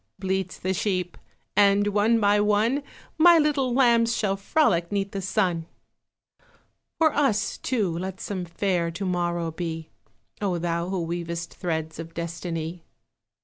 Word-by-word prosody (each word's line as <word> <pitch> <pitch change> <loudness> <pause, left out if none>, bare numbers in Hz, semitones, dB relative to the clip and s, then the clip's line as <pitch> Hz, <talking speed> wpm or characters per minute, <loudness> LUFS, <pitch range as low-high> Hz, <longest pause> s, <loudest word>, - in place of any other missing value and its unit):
bleats 190 -1 -2
the 185 +1 -1
sheep, 185 -2 -1 0.4
And 205 0 +4
one 210 +3 +3
by 205 -1 +4
one 210 +6 +2 0.4
My 345 +1 +8
little 295 -4 +2
lambs 235 -2 +3
shall 195 -2 +1
frolic 195 - +1
'Neath 200 -1 -1
the 195 - -4
sun. 180 -4 0 1.3
For 320 -1 +3
us, 220 -8 +1
too, 195 -10 -1
let 190 +1 -5
some 190 -3 -4
fair 175 0 -1
To 170 +4 -5
morrow 175 -2 -1
be, 160 -1 -5 0.5
O 190 -4 0
Thou 170 +1 -2
who 185 -3 -1
weavest 170 0 -4
threads 160 -3 -3
Of 165 0 -8
Destiny! 170 0 -4
190 Hz, 140 wpm, -25 LUFS, 170-210 Hz, 1.3 s, My